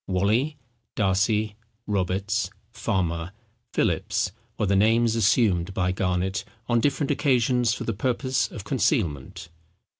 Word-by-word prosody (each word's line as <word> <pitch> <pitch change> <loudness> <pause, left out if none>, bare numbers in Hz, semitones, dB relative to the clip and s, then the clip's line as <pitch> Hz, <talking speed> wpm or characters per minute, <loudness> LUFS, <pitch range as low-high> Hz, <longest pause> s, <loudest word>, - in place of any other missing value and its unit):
Wally, 110 +11 +1 0.4
Darcy, 105 +2 +1 0.3
Roberts, 100 +2 0 0.2
Farmer, 85 -1 -2 0.4
Philips, - - 0 0.3
were - - +1
the 100 0 +2
names 115 +3 +3
assumed 100 -5 +2
by 90 -1 +1
Garnet 95 +1 -1 0.2
on 120 -1 +3
different 140 +3 +1
occasions 125 -3 +2
for - - -5
the 115 - -2
purpose 130 +4 0
of 105 - -8
concealment. 85 - -1
105 Hz, 115 wpm, -25 LUFS, 95-120 Hz, 0.4 s, names